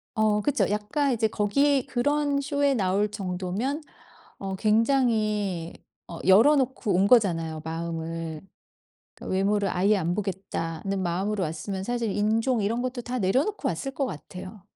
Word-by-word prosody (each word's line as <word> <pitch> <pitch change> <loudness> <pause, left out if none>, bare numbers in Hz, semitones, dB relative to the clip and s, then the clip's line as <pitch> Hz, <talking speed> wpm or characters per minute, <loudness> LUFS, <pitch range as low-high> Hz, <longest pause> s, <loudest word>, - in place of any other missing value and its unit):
어 215 -1 +2
그쵸. 285 +6 +1
약간 210 +7 0
이제 225 -1 +1
거기 270 +7 +2
그런 285 +3 +1
쇼에 285 0 +1
나올 200 -1 +1
정도면 195 - -3 0.6
어 195 -1 -4
굉장히 215 -5 +1 0.3
어 170 - -8
열어 220 +11 +7
놓고 255 -6 0
온 195 +2 +4
거잖아요 165 -9 +3
마음을. 165 -1 -4 0.7
그 - - -11
'외모를 200 +1 +1
아예 195 +4 +3
안 175 -2 -1
보겠다'는 190 -2 -3
마음으로 190 +3 -1
왔으면 170 +5 -4
사실 235 +1 -1
인종 225 +4 +1
이런 230 +4 0
것도 255 0 -3
다 245 +1 -3
내려놓고 265 - +1
왔을 270 -1 -3
것 275 - 0
같아요. 185 +3 -9
210 Hz, 295 characters per minute, -26 LUFS, 185-250 Hz, 0.7 s, 열어